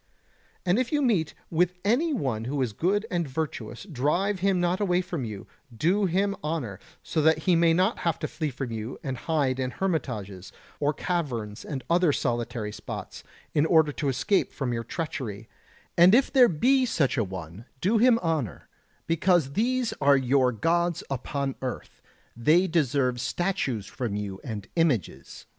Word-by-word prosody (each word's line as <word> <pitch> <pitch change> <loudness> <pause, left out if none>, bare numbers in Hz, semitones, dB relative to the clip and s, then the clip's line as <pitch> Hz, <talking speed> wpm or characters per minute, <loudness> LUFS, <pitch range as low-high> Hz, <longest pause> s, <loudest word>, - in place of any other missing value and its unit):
And 180 +5 +3
if 255 -1 -1
you 295 - +2
meet 190 - +1 0.2
with 180 +2 +2
any 270 +11 +2
one 130 - -1
who 140 +3 -2
is 115 -4 -3
good 200 - 0
and 170 -4 0
virtuous 130 -5 -4
drive 180 +5 0
him 190 0 +2
not 175 +1 +1
away 180 -3 +2
from 175 -6 -3
you, 105 -3 -7 0.3
do 190 - +2
him 200 +3 +1
honour, 145 - -3 0.2
so 160 - 0
that 160 +1 +4
he 180 -2 +4
may 165 0 +4
not 185 +7 +2
have 170 -2 0
to - - -3
flee 155 -2 -3
from 130 -2 -5
you 110 +2 -5
and 135 -1 -3
hide 135 -1 0
in 130 -1 -1
hermitages, 110 - -3 0.3
or 145 0 +2
caverns 125 - -3
and 135 -4 -5
other 170 -1 +3
solitary 120 -4 -2
spots, 105 0 -7 0.3
in 150 +1 +3
order 160 -3 +4
to 145 0 -2
escape 135 +10 +1
from 130 -4 -3
your 115 0 -2
treachery; 130 - -5 0.5
and 180 +5 +7
if 270 +3 +2
there 255 -3 +7
be 260 - +3
such 155 - +1
an 110 -8 -1
one 95 +3 -8
do 205 - +2
him 240 0 +6
honour, 150 - -2 0.4
because 165 -3 +2
these 245 - 0
are 140 0 +6
your 130 0 +3
gods 170 +8 0
upon 135 +1 -2
earth, 130 -1 -6 0.3
they 155 +10 +4
deserve 135 -7 +1
statues 140 - -1
from 115 -2 -4
you 100 -2 -5
and 105 -5 -6
images 120 - -1
150 Hz, 170 wpm, -27 LUFS, 120-180 Hz, 0.5 s, and